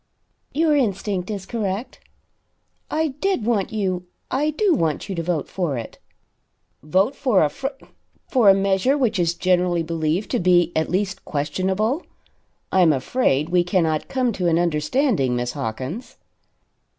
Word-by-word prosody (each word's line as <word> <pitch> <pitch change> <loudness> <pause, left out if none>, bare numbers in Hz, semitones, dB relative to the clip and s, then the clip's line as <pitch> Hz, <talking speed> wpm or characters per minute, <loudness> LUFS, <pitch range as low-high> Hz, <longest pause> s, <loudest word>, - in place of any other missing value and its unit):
"Your 310 0 +2
instinct 200 -7 -1
is 200 -3 -4
correct. 210 +1 -3 0.9
I 315 0 0
did 295 - -1
want 220 -5 0
you 185 -4 -2 0.2
I 290 +4 +1
do 370 +5 +2
want 165 - 0
you 195 - -3
to 170 - -2
vote 165 -3 -2
for 170 -8 -2
it." 115 - -7 0.8
"Vote 190 - +1
for 250 - +3
a 150 - +2
fr 265 - -4 0.6
for 240 -6 +4
a 195 - +7
measure 195 +7 +2
which 230 -7 +1
is 170 -1 +1
generally 180 -1 +1
believed 165 +3 -1
to - - +1
be 175 -1 +3
at 160 - 0
least 190 +1 -1
questionable? 190 - -1 0.7
I 190 - +4
am 170 -3 +6
afraid 145 - 0
we 175 0 +3
cannot 170 -4 0
come 255 -3 0
to 180 -3 -1
an 165 -1 +3
understanding, 165 - +1
Miss 120 0 -1
Hawkins." 140 - -5
185 Hz, 150 wpm, -22 LUFS, 165-235 Hz, 0.9 s, a